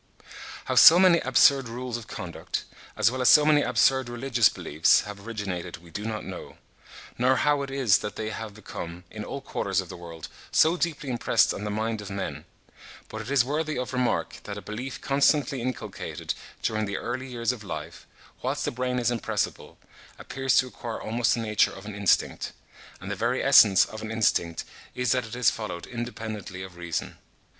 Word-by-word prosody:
How - - -1
so 165 - +9
many 180 -2 +6
absurd 135 -1 +4
rules 125 +1 -5
of 120 -2 -7
conduct, - - -5 0.3
as 115 - +4
well 130 0 -3
as 125 - +5
so 150 - +7
many 150 -1 +5
absurd 130 +1 +2
religious 120 -2 +2
beliefs, 80 +2 +2
have 105 0 -9
originated, 100 -6 -4
we 85 0 -17
do 105 +6 -5
not 110 -1 -4
know; - - -8 0.6
nor 130 +2 +4
how 145 0 +2
it 140 - -4
is 130 -7 +3
that 105 - -5
they 110 0 -4
have 110 -2 -7
become, 90 -4 -8
in 105 -1 -6
all 140 - -6
quarters 95 -6 -1
of 95 -3 -4
the - - -7
world, 85 -2 -9 0.2
so 160 +2 +4
deeply 155 -4 -2
impressed 120 - +2
on 105 - -6
the - - -2
mind 110 +1 -2
of 100 - -8
men; 100 0 -5 0.6
but - - -6
it - - -8
is 140 -3 +3
worthy 155 +2 -2
of 125 +1 -4
remark 125 -1 -1
that - - -6
a - - -6
belief 125 +5 -6
constantly 140 -1 +2
inculcated 130 +1 -4 0.3
during 110 -1 0
the 100 - -3
early 130 +2 -4
years 120 -1 -1
of 120 -4 -8
life, 100 - -7 0.3
whilst - - -2
the - - -1
brain 125 +1 -2
is 120 0 +1
impressible, 120 -3 -3 0.4
appears 135 -1 0
to 125 - +5
acquire 120 -2 -6
almost 115 +2 +1
the - - -4
nature 110 -2 +2
of 95 - -11
an 105 - -6
instinct; 100 -2 +1 0.5
and 95 +2 -7
the - - -2
very 120 +6 0
essence 110 -8 +7
of 110 - -9
an 110 - -6
instinct 100 -7 0 0.3
is 125 -2 0
that 125 -3 +1
it 110 - -7
is 125 -1 +3
followed 105 -6 -6
independently 110 -5 -6
of 95 -2 -10
reason. 85 -2 -4
115 Hz, 195 wpm, -26 LUFS, 105-130 Hz, 0.6 s, so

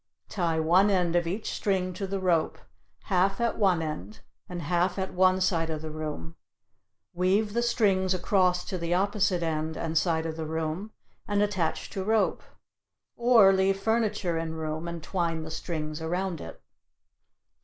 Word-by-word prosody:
Tie 170 -5 0
one 180 +6 +4
end 180 -3 +1
of 175 -1 +2
each 200 +6 -3
string 185 -2 -1
to 195 +2 -4
the 195 +1 -2
rope, 175 -4 +1 0.5
half 195 +2 +1
at 235 -1 0
one 185 -5 +3
end 110 - -6 0.3
and 175 -2 -5
half 175 +5 +1
at 190 -1 -3
one 185 0 +4
side 170 -3 +1
of 155 -1 -4
the 155 - -5
room; 150 - -6 0.8
weave 195 +4 +1
the 235 - +1
strings 200 -6 +2
across 180 -1 +2
to 185 - -4
the 170 +1 0
opposite 190 -2 +1
end 160 -1 -2
and 165 0 -3
side 160 0 +1
of 160 0 -4
the 160 -1 -4
room 160 +6 -3 0.4
and 205 0 +2
attach 190 -6 -1
to 190 - -3
rope. 220 +2 +1 0.7
Or 235 -5 +6
leave 195 0 +2
furniture 210 -6 0
in 160 0 -4
room 160 +1 -4
and 170 -2 -6
twine 165 -3 -2
the 160 - -7
strings 155 -2 -4
around 175 +1 -2
it. 80 - -9
180 Hz, 165 wpm, -27 LUFS, 160-195 Hz, 0.8 s, Or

